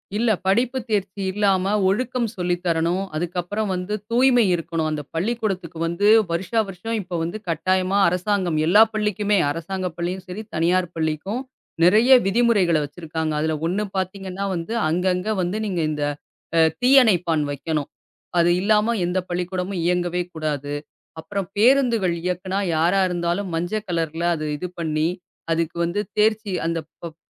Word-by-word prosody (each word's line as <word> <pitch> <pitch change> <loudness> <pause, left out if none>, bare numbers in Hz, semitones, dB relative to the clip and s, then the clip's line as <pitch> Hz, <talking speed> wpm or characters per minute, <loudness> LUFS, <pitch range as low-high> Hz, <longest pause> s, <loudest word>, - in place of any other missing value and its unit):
இல்ல. 230 +2 +1 0.2
படிப்பு 240 +6 +2
தேர்ச்சி 200 -1 -1
இல்லாம 195 -1 +1 0.2
ஒழுக்கம் 245 +4 0
சொல்லித் 180 -1 -2
தரணும். 170 +2 +1
அதுக்கு 175 +3 -3
அப்பறம் 205 +3 -3
வந்து, 180 +3 -4 0.2
தூய்மை 245 -1 +5
இருக்கணும். 165 -1 -2
அந்தப் 150 -2 -5
பள்ளிக்கூடத்துக்கு 190 -3 -2
வந்து, 170 +5 0 0.2
வருஷா 190 +7 0
வருஷம் 195 +5 -5
இப்போ 180 -2 -6
வந்து 175 +6 -3
கட்டாயமா 185 +4 +1
அரசாங்கம் 180 -2 0
எல்லா 210 +6 +7
பள்ளிக்குமே 210 -1 +1
அரசாங்க 180 +4 -3
பள்ளியும் 180 +2 -3
சேரி, 185 +4 -6
தனியார் 175 +2 +2
பள்ளிக்கும் 160 +9 -2 0.4
நெறைய 220 +8 +5
விதிமுறைகளைக் 195 -8 +3
வச்சிருக்காங்க. 160 0 -4
அதுல 155 0 0
ஒண்ணு 205 +5 -1
பாத்தீங்கன்னா 190 +1 -3
வந்து, 170 +7 -4 0.2
அங்கங்க 180 +3 0
வந்து 180 +4 -1
நீங்க 180 -4 -1
இந்த 150 -1 -2 0.5
அ - - +6 0.2
தீ 250 - +3
அணைப்பான் 175 -8 +2
வைக்கணும். 150 +1 -3 0.5
அது 170 0 +4
இல்லாம 215 +3 +3
எந்தப் 180 +1 -2
பள்ளிக்கூடமும் 180 +1 -3
இயங்கவே 180 0 0
கூடாது. 145 -2 -3 0.5
அப்பறம் 195 +3 -4
பேருந்துகள் 235 -6 +3
இயக்குனா 185 +2 -2 0.2
யாரா 175 +5 +3
இருந்தாலும் 175 +2 -2
மஞ்சள் 205 +6 -2
கலர்ல 165 -1 -2
அது 155 -1 -4
இது 180 - -4
பண்ணி, 155 -1 0 0.4
அதுக்கு 165 0 0
வந்து 170 +4 -1 0.2
தேர்ச்சி 215 -1 +2
அந்தப் 165 -2 -2 0.2
பப் 165 -2 -7
180 Hz, 140 wpm, -22 LUFS, 165-205 Hz, 0.5 s, எல்லா